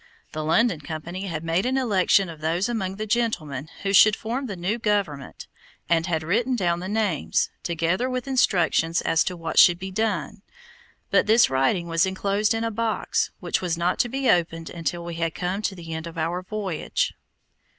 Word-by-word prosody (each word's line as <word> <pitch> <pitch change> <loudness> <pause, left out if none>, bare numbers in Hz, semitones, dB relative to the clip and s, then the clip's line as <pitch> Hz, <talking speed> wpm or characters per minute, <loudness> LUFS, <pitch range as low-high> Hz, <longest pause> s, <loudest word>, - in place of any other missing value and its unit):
The 155 - -4
London 170 +3 +2
Company 165 +6 -6
had 165 -3 -4
made 165 +3 +1
an 260 +2 0
election 200 -5 +3
of 160 -2 -10
those 170 +6 0
among 195 -6 -2
the 215 +2 -4
gentlemen 170 - -1
who 195 0 0
should 210 +1 +7
form 250 +5 -4
the 200 - -5
new 190 +6 -2
government, 195 - -2 0.4
and 165 0 +2
had 160 -3 -1
written 235 +10 +1
down 175 -6 0
the 185 - -5
names, 200 - 0
together 170 +8 0
with 255 +1 -3
instructions 175 -9 +2
as 165 - +2
to 180 - -3
what 165 -1 0
should 175 -2 +7
be 190 +1 -6
done; 200 -2 -2 0.7
but - - +3
this 225 - +5
writing 135 +7 +1
was 165 +2 +2
enclosed 200 +3 0
in 225 - -2
a 230 - -1
box 225 0 -1
which - - -1
was 175 -2 -1
not 175 +1 0
to 240 - +2
be 270 +2 -2
opened 165 -3 +1
until 170 0 -3
we 170 - -5
had 165 -1 -2
come 185 +3 -2
to 200 -2 -2
the 165 -2 -8
end 160 +1 -5
of 165 - -10
our 170 +3 -1
voyage. 190 -4 -2
185 Hz, 190 wpm, -24 LUFS, 165-215 Hz, 0.7 s, should